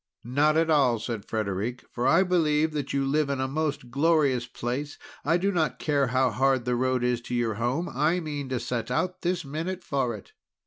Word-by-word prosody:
"Not 145 +6 +2
at 165 0 +2
all," 135 -6 +4
said 110 -2 -5
Frederic, 110 +3 -3
"for 125 +1 -1
I 165 +7 +5
believe 160 -4 +2
that 145 -3 -3
you 140 -1 0
live 145 +1 +1
in 140 -1 -1
a 130 - 0
most 145 -3 -2
glorious 140 -4 +2
place. 130 +6 -4 0.3
I 165 +4 +3
do 195 +3 +1
not 160 -5 0
care 145 -3 +1
how 130 0 +2
hard 130 +2 +2
the 125 0 +1
road 130 0 +1
is 125 -1 +1
to 120 - -4
your 120 -2 0
home, 120 - -1
I 155 +7 +1
mean 145 -5 -5
to 130 -2 -1
set 120 0 -3
out 180 +8 -1
this 175 -2 -1
minute 165 +6 -4
for 130 -5 -1
it." 100 - -13
135 Hz, 210 wpm, -27 LUFS, 125-155 Hz, 0.3 s, I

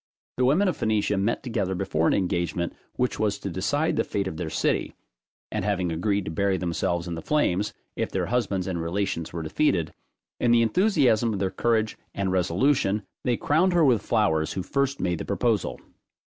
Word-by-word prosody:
The 125 - +3
women 165 +10 +3
of 180 - +1
Phoenicia 105 -1 +1
met 100 +4 0
together 105 -7 -1
before 90 -4 0
an - - +3
engagement 85 -2 -1 0.2
which 125 0 -1
was 105 -2 +1
to 100 - -5
decide 145 - 0
the - - +3
fate 100 -1 -2
of 80 - -5
their 85 -1 -3
city, - - 0 0.6
and - - -2
having 95 -4 0
agreed 100 +4 0
to - - -4
bury 95 +3 +1
themselves 85 0 -1
in 85 - -3
the 80 - -5
flames, 105 - +1 0.2
if - - -1
their - - -1
husbands 105 -7 0
and 90 -3 -2
relations 85 -1 -2
were 85 -1 -4
defeated, 80 - +1 0.5
in 120 - +2
the 115 0 +5
enthusiasm 120 - +3
of - - -2
their 95 -1 0
courage 110 +2 0 0.2
and 100 -1 -1
resolution, 95 +4 +2 0.2
they 120 -2 +2
crowned 175 +5 +2
her 170 -3 +4
with 120 -6 +4
flowers 95 -9 +1
who 95 - -3
first 140 +5 -1
made 90 -2 -1
the - - -3
proposal. 100 - 0
100 Hz, 190 wpm, -26 LUFS, 90-120 Hz, 0.6 s, the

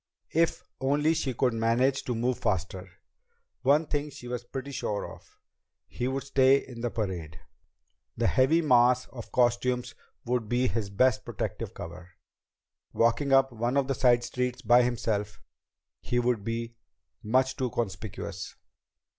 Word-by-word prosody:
If 165 +1 +1 0.2
only 145 +4 +2
she 140 -6 -2
could 125 0 +2
manage 120 +4 +1
to 125 - -2
move 120 +1 0
faster! 95 -1 -2 0.7
One 145 +4 +4
thing 145 0 -2
she 125 -3 -11
was 120 -1 -4
pretty 135 +3 -6
sure 105 -6 -3
of. - - -14 0.5
He 125 - -4
would 135 +1 -2
stay 135 0 +4
in 125 -4 -8
the 120 - -1
parade. 90 -9 -4 0.8
The - - 0
heavy 155 +6 +3
mass 125 -2 +4
of 120 -4 -10
costumes 125 0 +1 0.3
would 120 -3 -1
be 125 +1 +2
his 110 -5 -2
best 120 +5 +2
protective - - -5
cover. 85 +1 -9 0.8
Walking 120 +5 +2
up 135 0 +5
one 120 +3 -1
of 140 -1 +2
the 135 - +1
side 120 -2 +3
streets 125 0 -3
by 120 +2 +6
himself, 110 -4 -1 0.6
he 120 - -2
would 120 -3 +1
be 115 +1 -4 0.4
much 130 +4 +1
too 130 -1 -1
conspicuous. 110 -3 -5
125 Hz, 145 wpm, -28 LUFS, 115-130 Hz, 0.8 s, by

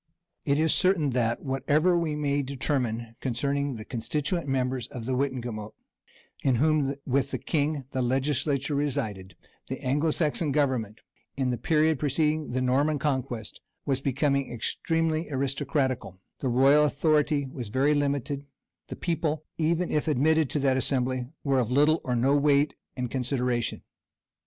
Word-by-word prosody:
It 140 - +2
is 160 +1 +3
certain 180 -6 +2
that, 120 -2 0
whatever 145 +6 +2
we 165 -3 0
may 145 -1 0
determine 125 -4 -2
concerning 140 +2 -1
the 110 -1 -8
constituent 145 +8 -2
members 130 -2 -1
of 120 -4 -7
the 130 - -1
wittenagemot, 120 -5 -3 0.7
in 130 -2 +2
whom, 145 +1 +2
with 135 +1 +1
the - - -2
king, 150 -3 -1
the 130 - -1
legislature 135 +2 0
resided, 105 - -2 0.3
the 130 - -4
Anglo 145 +4 +1
Saxon 155 -1 0
government, 130 -7 0 0.4
in 130 -2 +1
the 120 - -1
period 155 -2 +2
preceding 150 +1 0
the 130 +1 -1
Norman 140 +4 +2
conquest, 130 -6 -3 0.2
was 135 -2 0
becoming 140 -1 0
extremely 160 +6 -1
aristocratical: 130 - -1 0.2
the 130 - -1
royal 135 +5 +5
authority 150 0 +2
was 130 -3 -6
very 135 +7 +2
limited; 140 -1 -1 0.4
the - - -6
people, 160 -3 -2
even 170 +2 +1
if 150 - 0
admitted 155 +1 +3
to - - -1
that 135 -2 +2
assembly, 130 -1 0 0.2
were 135 -2 +2
of 120 -3 0
little 150 +5 +3
or 125 - -1
no 130 +4 +3
weight 145 0 +3 0.2
and 125 -2 -3
consideration. 125 -2 -1
140 Hz, 145 wpm, -27 LUFS, 125-150 Hz, 0.7 s, royal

